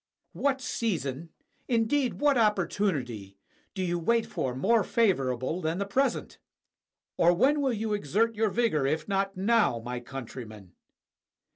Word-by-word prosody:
What 275 -2 0
season, 165 - -2 0.4
indeed, 240 +2 +1
what 290 -1 +2
opportunity, 170 - 0 0.4
do 190 - -2
you 175 -1 -1
wait 230 +7 +2
for 135 -10 -3
more 215 - +3
favorable 140 - 0
than 160 +1 -1
the 200 - -1
present? 265 +8 -1 0.8
or 175 +1 +4
when 280 +9 +3
will 270 -2 +1
you 220 -1 -2
exert 210 +5 +1
your 220 0 +1
vigor 200 - +1
if 155 +2 -1
not 195 -1 -1
now, 200 - +2
my 120 +2 -5
countrymen? 115 -6 -9
195 Hz, 135 wpm, -28 LUFS, -, 0.8 s, or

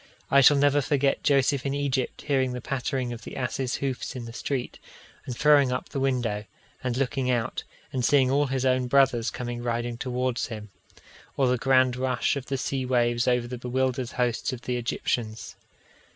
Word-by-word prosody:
I 140 - +7
shall 145 +2 +7
never 145 +1 +4
forget 140 0 +1
Joseph 140 -2 +2
in 140 0 -1
Egypt 140 -3 -2
hearing 130 -3 +1
the 125 - -4
pattering 130 -1 -2
of 115 - -9
the - - -8
asses' 125 +1 -2
hoofs 135 0 -3
in 125 -2 -5
the 115 - -9
street, 125 +1 -3 0.5
and 125 -2 -5
throwing 145 -3 +5
up 125 - -3
the 140 - -3
window, 120 -6 -1 0.4
and 125 -1 -1
looking 130 -1 0
out, 120 0 -1 0.3
and 130 -2 -1
seeing 130 0 +4
all 145 +1 +2
his 135 0 -1
own 130 -1 +2
brothers 125 -3 +3
coming 120 -1 -5
riding 120 0 -2
towards 125 -1 -1
him; 105 -3 -8 0.7
or 135 - +3
the 125 0 +2
grand 130 -1 +3
rush 130 +2 0
of 140 -2 -5
the 135 - -1
sea 130 0 -2
waves 120 -1 +1
over 125 -1 +2
the 125 0 -6
bewildered 130 0 -1
hosts 125 -1 -1
of 125 -1 -7
the 125 - -2
Egyptians. 115 -2 -3
130 Hz, 185 wpm, -26 LUFS, 120-135 Hz, 0.7 s, I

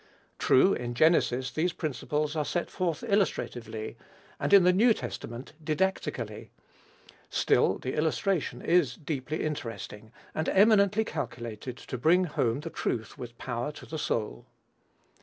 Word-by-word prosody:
True, 185 +10 +5
in 120 -1 -4
Genesis 130 -4 +3
these 170 +4 0
principles 150 +1 -2
are 155 - +1
set 175 +4 -2
forth 175 -2 -2
illustratively, 120 - -1 0.4
and - - -1
in 200 -2 +8
the 180 +1 +5
New 220 +4 +5
Testament 120 +5 -7
didactically; 170 +5 -2 0.8
still, - - +2
the 130 - -4
illustration 160 +3 0
is 170 -7 +3
deeply 150 -1 -3
interesting, 115 -7 -5 0.2
and 155 - -1
eminently 210 +1 +4
calculated 120 - -5
to 125 - -6
bring 170 +8 +4
home 135 -6 0
the 165 +1 -6
truth 115 -7 -3
with 120 -1 -8
power 120 +3 -3
to - - -11
the 160 - -5
soul. 105 - -2
150 Hz, 135 wpm, -29 LUFS, 120-180 Hz, 0.8 s, in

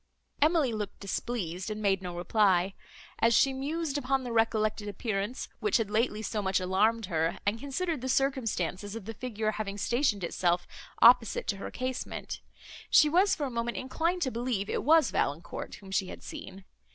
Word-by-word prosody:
Emily 300 -5 +3
looked 210 -2 -4
displeased, 195 -3 -3
and 215 0 -4
made 195 -2 +1
no 180 -2 -6
reply. 185 0 +2 0.5
As 230 0 +4
she 270 +3 +4
mused 295 +2 -2
upon 270 -1 0
the 245 - -5
recollected 215 -2 +1
appearance, 205 +3 -3
which 425 - +2
had 220 -3 -2
lately 215 0 +1
so 210 +1 -2
much 190 -1 +1
alarmed 205 +5 +2
her, 165 -2 0
and 205 +3 0
considered 285 +3 -2
the 260 - -3
circumstances 225 - 0
of 225 -4 -7
the 225 - -5
figure 220 -2 -2
having 205 -2 -4
stationed 235 -2 +1
itself 175 0 +1 0.4
opposite 230 -2 +6
to 200 - 0
her 195 - -6
casement, 255 0 -4 0.5
she 305 - +6
was 370 +6 +4
for 295 - -2
a 265 - -4
moment 235 0 -2
inclined 335 +7 -1
to 260 - -1
believe 235 -4 -2
it - - -1
was 315 -1 +5
Valancourt, 145 +4 -2
whom 195 -1 -12
she 195 -1 +1
had - - -9
seen. 195 0 -9
225 Hz, 175 wpm, -29 LUFS, 195-260 Hz, 0.5 s, opposite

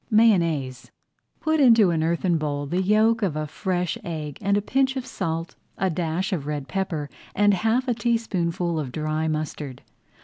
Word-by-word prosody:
MAYONNAISE 170 - +2 0.5
Put 315 -1 +1
into 230 -8 +6
an 160 -1 0
earthen 170 +1 +1
bowl 145 -1 -2
the 175 +6 -1
yolk 215 +4 +3
of 185 -7 0
a 155 0 -2
fresh 180 +3 -2
egg 150 -4 -5
and 200 0 +2
a - - +1
pinch 265 +3 +1
of 260 -2 -3
salt, 165 -8 -3 0.2
a 190 0 +1
dash 175 +4 -1
of 150 -6 -3
red 145 -2 -3
pepper, 175 -5 -2 0.3
and 205 0 +4
half 225 +7 +1
a 245 - +2
teaspoonful 185 -8 -1
of 135 -5 -4
dry 155 +2 -1
mustard. 150 -4 -4
175 Hz, 170 wpm, -24 LUFS, 155-215 Hz, 0.5 s, into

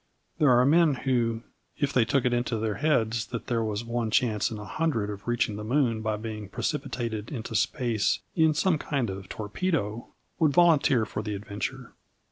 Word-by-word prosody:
There 150 - +5
are 125 0 +5
men 155 0 +4
who, 120 -3 0 0.3
if 145 -1 0
they 120 -3 +4
took 135 +1 +1
it 125 - +2
into 120 -1 0
their 110 -1 -1
heads 115 -7 +1
that 115 - -5
there 115 -2 0
was 105 0 -2
one 115 -1 -1
chance 110 -2 +2
in 110 - -6
a 105 - -7
hundred 115 -2 -1
of 100 +2 -9
reaching 120 -3 0
the 105 - -5
moon 120 -1 +1
by 110 -1 -1
being 105 -2 -6
precipitated 115 -3 -3
into 115 -5 -5
space 115 -2 +1 0.2
in 160 -2 +4
some 175 -2 +2
kind 130 -9 -1
of 95 0 -8
torpedo, 110 - -2 0.3
would 155 -4 +3
volunteer 145 -8 +4
for 105 - -4
the 105 -1 -4
adventure. 105 +6 -5
115 Hz, 185 wpm, -27 LUFS, 110-135 Hz, 0.3 s, There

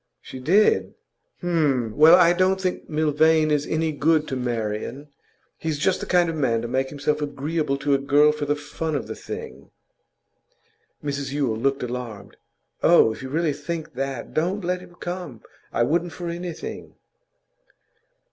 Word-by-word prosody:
'She 130 - -10
did? 185 +11 +3 0.5
H'm! 145 -10 +1
Well, 155 +3 +8
I 175 -1 +6
don't 185 +1 +2
think 185 -1 -3
Milvain 155 0 +3
is 150 -1 +1
any 160 0 0
good 155 +1 +2
to 135 - -2
Marian. 120 +3 -3 0.5
He's 160 -2 -2
just 180 +5 +1
the - - -6
kind 175 -1 +3
of 165 - -2
man 120 -6 0
to - - -3
make 130 +2 -1
himself 150 +1 -1
agreeable 145 0 -2
to 140 +1 0
a 135 - +3
girl 145 +2 +4
for 150 -1 -4
the 145 - +2
fun 150 +2 -4
of 140 - -2
the - - -5
thing.' 65 +2 -8 1.3
Mrs 140 -1 -3
Yule 135 -6 0
looked 135 +4 0
alarmed. 120 -4 -6 0.4
'Oh, 110 - +5
if - - -11
you 130 - -6
really 155 +1 0
think 165 +1 -5
that, 135 -1 -4
don't 180 +5 -1
let 180 0 -1
him 180 -1 -15
come. 175 - -6 0.3
I 120 - +1
wouldn't 170 +6 0
for 175 -1 -5
anything. 170 -1 -6
150 Hz, 165 wpm, -24 LUFS, 135-165 Hz, 1.3 s, Well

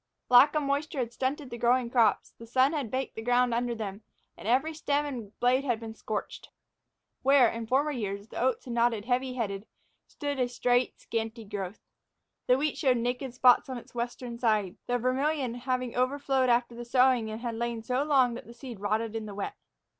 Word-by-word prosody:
Lack 265 +5 +7
of 305 - +2
moisture 285 +2 -1
had 240 -2 -2
stunted 265 +1 -2
the 235 - -6
growing 245 +1 +3
crops, 235 -3 +3
the 230 - -10
sun 260 +5 +3
had 285 -7 -2
baked 260 +3 -3
the 225 - -6
ground 245 +1 +2
under 240 0 0
them, 205 -2 -5 0.3
and - - -9
every 270 +7 +2
stem 295 -1 0
and 235 -8 -7
blade 255 +2 +3
had 240 -5 0
been 225 -1 -7
scorched. 215 -1 -5 0.7
Where, 270 -2 +6
in 230 0 -4
former 275 +5 +2
years, 205 -5 -4
the - - -6
oats 255 0 0
had 245 - -5
nodded 235 -3 +1
heavy 255 +1 0
headed 205 -4 -3 0.4
stood 285 -2 -4
a 250 - +2
straight, 245 0 +1
scanty 225 0 -4
growth. 200 -1 -5 0.7
The 250 - +5
wheat 300 +1 -1
showed 260 -4 +3
naked 245 +2 -2
spots 250 +1 +5
on 260 - -4
its 240 - -12
western 240 0 -4
side, 215 -5 +1
the 245 - +1
Vermillion 260 +1 0
having 250 0 -2
overflowed 265 0 +1
after 240 0 +2
the 240 +1 -7
sowing 250 -2 +3
and 225 +1 -4
lain 235 -1 -2
so 250 +4 0
long 265 -5 +3
that 235 - -8
the 235 - -12
seed 240 -3 -9
rotted 215 +2 -1
in 220 -1 -4
the 205 - -8
wet. 205 - -4
245 Hz, 200 wpm, -29 LUFS, 230-260 Hz, 0.7 s, Lack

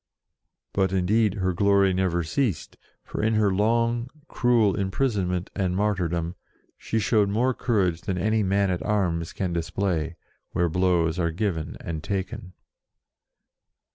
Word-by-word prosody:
But, 95 -1 +1
indeed, 100 +3 +2
her 95 -3 0
glory 100 +1 +3
never 90 -2 0
ceased, 105 - -2 0.3
for - - -5
in 110 +1 +2
her 105 -3 +3
long, 115 +4 +1 0.2
cruel 115 -5 +3
imprisonment 95 -3 -1
and 90 -2 0
mar 105 +2 +2
tyrdom, 85 -2 -2 0.4
she 115 - -3
showed 105 -2 +2
more 120 +6 +1
courage 95 -10 0
than 95 0 -3
any 110 +4 +1
man 100 0 +2
at 90 - -2
arms 85 -6 0
can 90 -3 -3
display, 85 -1 -1 0.4
where 85 0 +1
blows 85 -1 +1
are 85 -1 +1
given 85 -3 -2
and 80 -3 -5
taken. 95 0 -4
95 Hz, 140 wpm, -25 LUFS, 85-105 Hz, 0.4 s, glory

